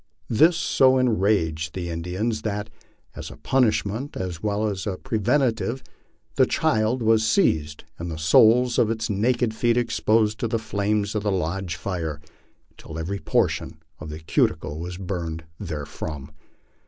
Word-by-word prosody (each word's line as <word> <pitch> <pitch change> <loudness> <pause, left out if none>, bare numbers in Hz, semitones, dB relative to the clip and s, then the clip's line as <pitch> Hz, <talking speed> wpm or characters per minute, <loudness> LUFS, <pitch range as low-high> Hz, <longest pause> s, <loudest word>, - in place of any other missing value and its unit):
This 160 +9 +5
so 130 -4 +4
en 125 -5 +2
raged 80 -6 0
the 85 -2 -3
Indians 90 +7 -2
that, 105 0 -3 0.4
as - - -7
a - - -11
punishment 125 0 0
as 90 -3 -4
well 105 0 0
as 100 -1 -3 0.2
preventive, 125 +1 0 0.5
the - - +5
child 110 +3 +1
was 110 0 +4
seized 80 - +1 0.2
and 85 +1 -4
the 80 - -5
soles 115 +10 +5
of 110 - +3
its 110 -1 -2
naked 115 +3 +1
feet 115 +1 +1
exposed 110 -2 +1
to 115 - 0
the 115 - 0
flames 105 -1 -1
of 105 - -1
the 105 0 0
lodge 90 0 -2
fire 85 -5 -4 0.5
until 80 - -10
every 95 +5 -3
portion - - 0 0.2
of 75 - -8
the 75 - -6
cuticle 80 -1 0
was 90 +1 -5
burned 85 -4 -4 0.2
therefrom. 75 -4 -6
105 Hz, 150 wpm, -24 LUFS, 85-115 Hz, 0.5 s, This